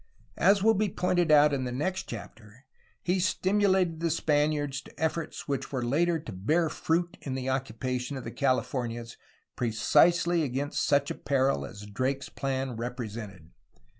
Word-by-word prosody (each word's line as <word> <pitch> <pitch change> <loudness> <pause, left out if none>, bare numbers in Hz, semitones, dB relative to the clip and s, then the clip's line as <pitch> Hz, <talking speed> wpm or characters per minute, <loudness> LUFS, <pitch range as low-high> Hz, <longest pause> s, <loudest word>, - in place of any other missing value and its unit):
As 195 +2 +4
will 225 +1 +6
be 210 0 +1
pointed 175 -2 +1
out 150 -1 +6
in 135 -2 0
the 125 - -3
next 185 +9 -2
chapter, 110 +2 -10 0.4
he 180 +1 +1
stimulated 185 -2 +2
the 170 0 0
Spaniards 145 -3 +1
to - - -16
efforts 160 0 -2
which 140 -2 -3
were 130 -3 -2
later 165 +7 +2
to 150 -7 -8
bear 155 - +1
fruit 170 +4 -1
in 130 -2 -4
the 130 0 -3
occupation 130 0 -3
of 130 - -6
the 115 - -6
Californias 120 -3 -1 0.4
precisely 165 +9 +3
against 140 0 -1
such 140 0 +2
a - - -1
peril 130 - 0
as 100 +6 -10
Drake's 130 +6 -2
plan 130 -3 -3
represented. 110 -7 -6
140 Hz, 155 wpm, -28 LUFS, 125-170 Hz, 0.4 s, will